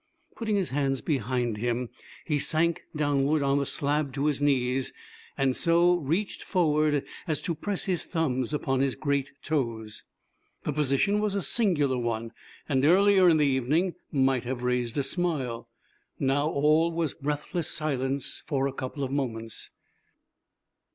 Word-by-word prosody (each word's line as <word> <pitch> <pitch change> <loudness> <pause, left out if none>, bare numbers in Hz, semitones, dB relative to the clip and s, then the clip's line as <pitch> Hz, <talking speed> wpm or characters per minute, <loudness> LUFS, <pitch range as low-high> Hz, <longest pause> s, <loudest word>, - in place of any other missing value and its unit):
Putting 220 -3 -1
his 190 -7 0
hands 135 -1 0
behind 125 -5 -1
him, 120 +2 -1 0.4
he 150 -3 0
sank 165 +3 +1
downward 145 0 +1
on 140 0 +2
the 140 - -1
slab 145 -1 -1
to 140 +1 -1
his 150 -2 +1
knees, 130 -2 +1 0.4
and 135 -1 +2
so 175 +1 +3
reached 170 +7 -2
forward 150 -5 +2 0.2
as 155 -2 0
to 170 - -2
press 195 +5 -3
his 185 -3 -1
thumbs 130 -7 -1
upon 135 -3 0
his 135 -1 +1
great 140 -2 -1
toes. 115 -8 -2 0.6
The 150 - -2
position 150 +8 +2
was 210 -1 0
a 200 - -1
singular 150 - +2
one, 115 -1 -2 0.4
and 135 -3 +1
earlier 190 +3 +6
in 160 - +5
the 150 - +3
evening 145 +7 +1 0.2
might 135 -3 +2
have 125 0 -4
raised 125 -1 -1
a 140 - +2
smile. 135 -8 -2 0.5
Now 140 +2 +1
all 155 +3 +3
was 165 -3 -1
breathless 150 +4 -3
silence 135 -3 -2
for 140 -3 0
a 140 - -2
couple 135 +2 -5
of 130 - -3
moments. 115 -5 -3
140 Hz, 150 wpm, -27 LUFS, 130-160 Hz, 0.6 s, earlier